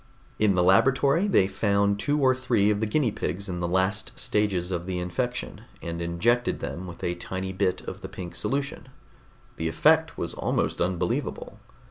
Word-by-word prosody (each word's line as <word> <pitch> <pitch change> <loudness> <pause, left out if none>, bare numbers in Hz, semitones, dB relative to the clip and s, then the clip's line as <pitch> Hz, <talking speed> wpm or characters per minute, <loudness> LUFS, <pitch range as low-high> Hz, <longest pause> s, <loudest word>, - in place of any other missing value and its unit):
In 105 -3 +3
the 90 - +3
laboratory 135 - +4
they 185 - +4
found 100 +1 +1
two 145 +6 +1
or 130 -2 +4
three 120 -5 +2
of 105 - 0
the 110 - 0
guinea 120 +1 +1
pigs 100 0 -3
in 90 -2 -4
the 85 - -1
last 95 +4 +1
stages 95 -4 0
of 90 0 -3
the 95 -1 -2
infection, 120 +8 -3 0.2
and 85 0 -5
injected 115 +9 +1
them 70 +7 -5
with 85 - -10
a 85 - 0
tiny 95 +2 -5
bit 95 -1 0
of - - -8
the - - -7
pink 90 -2 -7
solution. 140 -1 -3 0.7
The 80 - -1
effect 160 - +3
was 85 - -2
almost - - -1
unbelievable. 90 0 -2
100 Hz, 175 wpm, -26 LUFS, 90-120 Hz, 0.7 s, laboratory